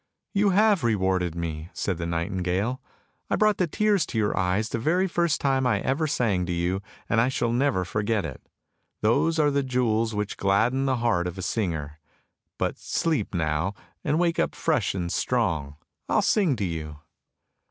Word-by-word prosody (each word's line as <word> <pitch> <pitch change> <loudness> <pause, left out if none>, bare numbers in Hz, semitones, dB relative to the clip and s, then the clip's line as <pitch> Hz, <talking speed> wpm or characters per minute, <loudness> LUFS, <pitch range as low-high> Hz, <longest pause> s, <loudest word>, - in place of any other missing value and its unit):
" - - -58
" - - -54
You 200 0 +3
have 205 -1 +4
rewarded 95 -6 +1
me," 80 -1 -4
said 90 -4 -2
the 85 - -2
nightingale. 90 +7 -1 0.2
" - - -45
I - - +2
brought 215 -1 +3
the 180 - +1
tears 205 +2 +2
to - - -4
your 105 -2 +1
eyes 95 +4 +1
the 115 - -2
very 175 +10 +2
first 170 -3 +1
time 135 -2 +1
I 125 - +2
ever 145 +4 0
sang 115 -10 +1
to - - -2
you, 90 +3 -1 0.3
and 115 - +3
I 125 - +2
shall 120 -3 0
never 120 -7 +1
forget 105 +1 -1
it! 70 -5 -7 0.6
Those 140 +9 +2
are 150 -2 +3
the 140 0 +1
jewels 115 -4 0
which 105 -1 -3
gladden 115 +8 +2
the 130 - +2
heart 90 -7 +2
of 90 +1 -6
a 95 - -5
singer; 80 -8 -2 0.6
but - - -2
sleep 150 - -1
now, 80 +4 0 0.3
and 150 +1 +1
wake 170 -1 +1
up - - 0
fresh 140 - 0
and 85 -2 -2
strong; 70 -3 0 0.3
I - - +1
will - - +5
sing 185 -10 +3
to 105 -4 -2
you! 80 -3 -5
110 Hz, 195 wpm, -26 LUFS, 90-140 Hz, 0.6 s, will